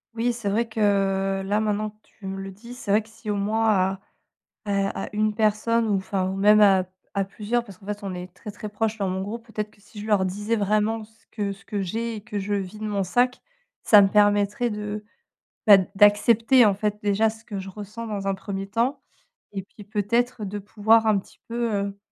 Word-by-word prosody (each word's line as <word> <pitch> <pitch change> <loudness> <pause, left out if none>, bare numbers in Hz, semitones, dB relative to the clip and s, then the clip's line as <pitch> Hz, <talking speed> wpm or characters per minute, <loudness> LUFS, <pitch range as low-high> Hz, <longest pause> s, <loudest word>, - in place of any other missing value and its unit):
Oui, 235 +1 +1
c'est 230 -4 -3
vrai 225 +4 +1
que 195 -3 +1
là, 205 +2 +1
maintenant 215 0 -1
que - - -31
tu 210 - -16
me 195 0 -4
le 195 0 -6
dis, 235 +6 -11
c'est 245 -5 -5
vrai 210 +2 +5
que 215 - -18
si 220 0 -10
au 205 - +1
moins, 220 +3 +1
à 190 -1 +1 0.7
à 200 -1 -1
à - - -6
1 215 0 +1
personne 220 +2 +2
ou 205 - +2
enfin 190 0 -1
ou 190 - -3
même 210 +2 +6
à 195 -3 +6 0.3
à 200 -1 +1
plusieurs, 215 +5 -2
parce 195 -5 -13
qu'en 195 - -17
fait, 205 +1 -4
on 195 -2 -4
est 180 0 -6
très, 210 - -8
très 210 +1 -7
proche 220 +1 -2
dans 195 -2 0
mon 190 +1 -2
groupe, 225 +4 -6
peut-être 215 -2 -4
que 210 - -25
si 210 +1 -15
je 210 - -6
leur 200 -3 +3
disais 205 +5 -1
vraiment 215 +2 +1
ce 220 +1 -24
que 205 -2 -2
ce 195 +2 -14
que 205 - -3
j'ai 225 +5 -3
et - - -6
que 210 0 -5
je 200 +1 -3
vide 200 +1 -3
de - - -2
mon 205 -2 0
sac, 245 +7 +1 0.4
ça 210 -2 +8
me 195 - +4
permettrait 205 +3 +3
de, 210 -1 -4 0.7
bah, 205 -2 +10 0.2
d'accepter, 225 +4 +5
en 205 - +4
fait, 210 +1 -1
déjà 210 +2 +3
ce 225 +1 -12
que 205 -3 -5
je 190 0 -7
ressens 210 +4 -7
dans 205 -2 -4
un 195 - +2
1er 195 0 -5
temps 235 +7 0 0.5
et 195 -2 -4
puis 205 +2 -15
peut-être, 220 +3 0
de 205 +1 -4
pouvoir 220 +2 +3
un 215 -2 +4
petit 190 - -12
peu, 235 -1 -1
heu 200 0 -2
210 Hz, 230 wpm, -24 LUFS, 195-220 Hz, 0.7 s, bah